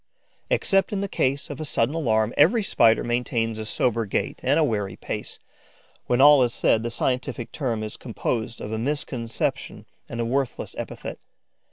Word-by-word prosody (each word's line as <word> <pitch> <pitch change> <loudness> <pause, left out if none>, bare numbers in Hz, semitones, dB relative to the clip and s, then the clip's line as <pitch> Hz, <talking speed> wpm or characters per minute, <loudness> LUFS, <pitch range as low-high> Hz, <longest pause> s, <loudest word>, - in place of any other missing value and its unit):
Except 195 - +2
in 200 -2 -1
the 200 - -1
case 140 -5 -1
of 145 +2 -6
a - - -2
sudden 135 -3 0
alarm, 115 -8 +1
every 205 +10 +5
Spider 115 - +4
maintains 120 -2 -1
a 110 - -4
sober 115 0 0
gait - - -2
and - - +2
a - - +4
wary 105 -4 -1
pace. - - -6 0.7
When 120 - +2
all 145 0 +8
is 120 -2 +1
said, 110 - +3
the 120 - -2
scientific 125 -1 -2
term 120 -7 -2
is 110 - -6
composed 115 -1 -3
of 105 - -5
a 110 - -2
misconception 120 -3 -3 0.2
and 120 - -5
a 115 - 0
worthless 135 +2 -2
epithet. - - -6
120 Hz, 175 wpm, -24 LUFS, 115-140 Hz, 0.7 s, all